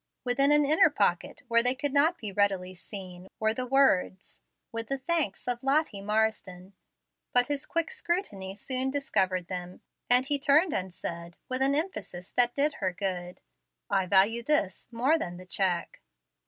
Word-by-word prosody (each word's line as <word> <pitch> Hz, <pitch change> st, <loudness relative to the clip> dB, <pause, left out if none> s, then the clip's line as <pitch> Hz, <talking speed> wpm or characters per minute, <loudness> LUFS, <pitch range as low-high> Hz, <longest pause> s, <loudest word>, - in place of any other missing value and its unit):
Within 275 Hz, +3 st, +2 dB
an 295 Hz, 0 st, +5 dB
inner 310 Hz, +2 st, +5 dB
pocket, 205 Hz, -1 st, -1 dB
where 235 Hz, 0 st, +5 dB
they 250 Hz, +2 st, +2 dB
could 285 Hz, 0 st, -3 dB
not 310 Hz, +5 st, +3 dB
be 215 Hz, -7 st, -6 dB
readily 195 Hz, -2 st, 0 dB
seen, 185 Hz, 0 st, -9 dB
were 220 Hz, 0 st, +2 dB
the 250 Hz, +2 st, -4 dB
words, 245 Hz, -8 st, +1 dB, 0.3 s
"With 230 Hz, 0 st, -5 dB
the 275 Hz, -, -2 dB
thanks 285 Hz, -, -2 dB
of 245 Hz, -1 st, -1 dB
Lottie 275 Hz, -6 st, 0 dB
Marsden." 205 Hz, -3 st, -2 dB, 0.6 s
But 245 Hz, +2 st, +3 dB
his 285 Hz, 0 st, -3 dB
quick 335 Hz, -1 st, 0 dB
scrutiny 200 Hz, -, -3 dB
soon 255 Hz, +5 st, -1 dB
discovered 190 Hz, -10 st, 0 dB
them, 180 Hz, 0 st, -6 dB, 0.3 s
and 250 Hz, +1 st, +5 dB
he 285 Hz, 0 st, -1 dB
turned 290 Hz, +5 st, +3 dB
and 185 Hz, 0 st, -3 dB
said, 170 Hz, -1 st, -7 dB
with 255 Hz, +1 st, -3 dB
an 275 Hz, +1 st, +2 dB
emphasis 290 Hz, -, -4 dB
that 245 Hz, -1 st, +3 dB
did 290 Hz, +1 st, +1 dB
her 185 Hz, -1 st, 0 dB
good, 180 Hz, -1 st, -4 dB, 0.5 s
"I 190 Hz, -1 st, +1 dB
value 200 Hz, +5 st, +4 dB
this 235 Hz, -7 st, -1 dB
more 260 Hz, +8 st, +2 dB
than 175 Hz, -, -5 dB
the 185 Hz, -, -11 dB
check." 180 Hz, -2 st, -1 dB
230 Hz, 170 wpm, -28 LUFS, 190-280 Hz, 0.6 s, an